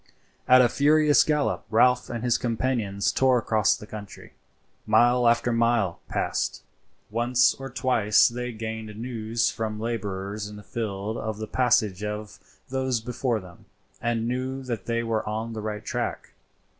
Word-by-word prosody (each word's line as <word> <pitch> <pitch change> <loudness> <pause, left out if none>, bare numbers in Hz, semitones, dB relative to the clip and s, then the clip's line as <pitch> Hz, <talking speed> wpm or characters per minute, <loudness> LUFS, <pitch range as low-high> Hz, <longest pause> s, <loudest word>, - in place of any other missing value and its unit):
At 130 0 +7
a - - +5
furious 150 +3 +4
gallop 150 -2 0
Ralph 125 +3 +3
and 120 -1 -4
his 120 -2 +2
companions 115 -4 -1
tore 130 -1 +3
across 110 -3 +2
the - - -10
country. 105 -2 -10 0.5
Mile 120 +3 +4
after 120 +1 +2
mile 115 -6 +1
was - - -18
passed. - - -2 0.5
Once 120 +3 +3
or 135 0 -8
twice 125 -5 +3
they 125 +1 -4
gained 110 -1 -6
news 115 -1 -1
from 110 -1 -4
labourers 105 -2 -4
in 105 - -10
the 105 - -11
field 105 0 -4
of 110 -1 -4
the 110 - -4
passage 110 -5 +1
of 105 0 -5 0.3
those 130 -2 0
before 120 0 -2
them, 95 +2 -14 0.4
and 115 -1 -1
knew 130 +2 -3
that 120 -6 -5
they 115 0 0
were 115 -1 -1
on 110 +2 -3
the 110 - -5
right 105 -1 -5
track. - - -3
115 Hz, 155 wpm, -26 LUFS, 105-125 Hz, 0.5 s, At